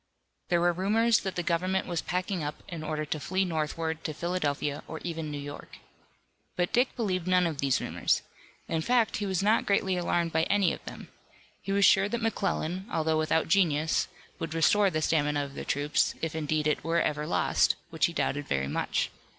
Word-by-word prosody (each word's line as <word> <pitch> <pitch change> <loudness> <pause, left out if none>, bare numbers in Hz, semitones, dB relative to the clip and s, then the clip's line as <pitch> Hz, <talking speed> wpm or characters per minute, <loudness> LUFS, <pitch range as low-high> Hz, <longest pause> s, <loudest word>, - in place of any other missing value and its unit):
There 175 -1 +3
were 175 0 +3
rumors 220 +6 +3
that 190 -1 -4
the 175 - -1
government 185 +3 0
was 175 -2 -2
packing 180 -1 -2
up 145 0 -5
in 170 -3 -6
order 155 0 -2
to 155 +1 -3
flee 190 +5 0
northward 160 -1 -2
to 155 - -4
Philadelphia 150 -4 -1
or 160 - -6
even 165 -3 -4
New 145 - -4
York. 145 0 -8 0.8
But 175 0 -1
Dick 250 +2 +2
believed 185 -7 -1
none 180 -1 +4
of 160 -4 -2
these 135 -2 +2
rumors. - - 0 0.4
In 165 -1 -1
fact, 235 +3 +2
he 205 - -2
was 190 -1 0
not 215 +2 +3
greatly 190 -2 +2
alarmed 170 -1 0
by 160 - +2
any 200 -4 +2
of - - -9
them. - - -9 0.5
He 195 - -4
was 200 0 +4
sure 195 +1 +5
that 235 - -1
McClellan, 190 -3 -1
although 160 -1 +1
without 155 +1 +1
genius, 160 -4 +2 0.3
would 165 0 -4
restore 200 +5 +4
the 155 -3 -1
stamina 150 -2 +1
of 140 - -10
the - - -6
troops, 145 +1 +1
if 160 -1 -3
indeed 155 -1 -1
it 150 0 +1
were 165 +2 +1
ever 150 -1 -1
lost, 90 -2 +2 0.2
which - - +2
he - - -7
doubted 145 +1 -1
very 70 0 0
much. 70 - -1
165 Hz, 200 wpm, -28 LUFS, 155-190 Hz, 0.8 s, sure